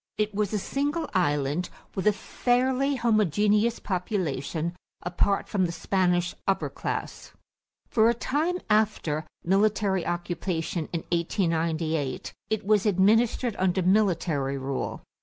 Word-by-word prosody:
It 210 Hz, 0 st, 0 dB
was 205 Hz, -1 st, 0 dB
a 215 Hz, -, 0 dB
single 290 Hz, -, -1 dB
island 145 Hz, -2 st, +1 dB, 0.2 s
with 190 Hz, +2 st, -1 dB
a -, -, +7 dB
fairly 255 Hz, +6 st, +1 dB
homogeneous 215 Hz, -, +2 dB
population 170 Hz, -, -2 dB, 0.3 s
apart 180 Hz, +3 st, 0 dB
from 185 Hz, -3 st, +1 dB
the -, -, -4 dB
Spanish 175 Hz, -1 st, +1 dB
upper 195 Hz, -, +1 dB
class. -, -, -5 dB, 0.5 s
For 225 Hz, 0 st, +4 dB
a 235 Hz, -, +2 dB
time 305 Hz, +9 st, 0 dB
after 205 Hz, -8 st, +1 dB, 0.2 s
military 195 Hz, 0 st, +2 dB
occupation 175 Hz, -1 st, -2 dB
in 170 Hz, -, -2 dB
1898, 165 Hz, -4 st, -1 dB, 0.2 s
it 220 Hz, -3 st, -1 dB
was 210 Hz, 0 st, +3 dB
administered 220 Hz, +4 st, +3 dB
under 185 Hz, 0 st, +2 dB
military 170 Hz, -8 st, +2 dB
rule. 135 Hz, 0 st, -4 dB
190 Hz, 120 wpm, -27 LUFS, 170-215 Hz, 0.5 s, a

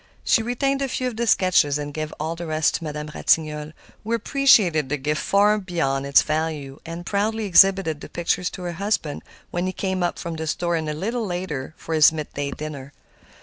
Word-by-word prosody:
She -, -, +3 dB
retained 270 Hz, +4 st, -1 dB
a 275 Hz, -, 0 dB
few 255 Hz, 0 st, -2 dB
of 240 Hz, -, -9 dB
the 235 Hz, +1 st, -2 dB
sketches, 180 Hz, -8 st, +3 dB
and 145 Hz, 0 st, -5 dB
gave 155 Hz, 0 st, -4 dB
all 160 Hz, +2 st, -2 dB
the 170 Hz, 0 st, -6 dB
rest 155 Hz, 0 st, +1 dB
to -, -, -3 dB
Madame 150 Hz, -1 st, -5 dB
Ratignolle, 155 Hz, -1 st, +1 dB, 0.3 s
who 225 Hz, +2 st, -2 dB
appreciated 210 Hz, -, +3 dB
the 150 Hz, -, 0 dB
gift 150 Hz, +3 st, -2 dB
far 210 Hz, +2 st, +3 dB
beyond 140 Hz, -8 st, -1 dB
its 140 Hz, -, +5 dB
value 155 Hz, -3 st, -3 dB
and 170 Hz, +1 st, -7 dB
proudly 215 Hz, +3 st, -1 dB
exhibited 190 Hz, -4 st, +4 dB
the -, -, -9 dB
pictures 175 Hz, +1 st, -1 dB
to 185 Hz, -, -9 dB
her 175 Hz, -, -3 dB
husband 200 Hz, -8 st, -1 dB, 0.3 s
when 175 Hz, +1 st, -1 dB
he -, -, -1 dB
came 190 Hz, -1 st, -2 dB
up 175 Hz, -, -1 dB
from 170 Hz, -1 st, -5 dB
the 160 Hz, 0 st, -4 dB
store 170 Hz, +2 st, -1 dB
a -, -, -1 dB
little 195 Hz, +10 st, -3 dB
later 170 Hz, -6 st, -4 dB
for 165 Hz, -, -6 dB
his 155 Hz, -1 st, +6 dB
midday 145 Hz, -2 st, -4 dB
dinner. 145 Hz, -2 st, -7 dB
165 Hz, 200 wpm, -23 LUFS, 150-200 Hz, 0.3 s, his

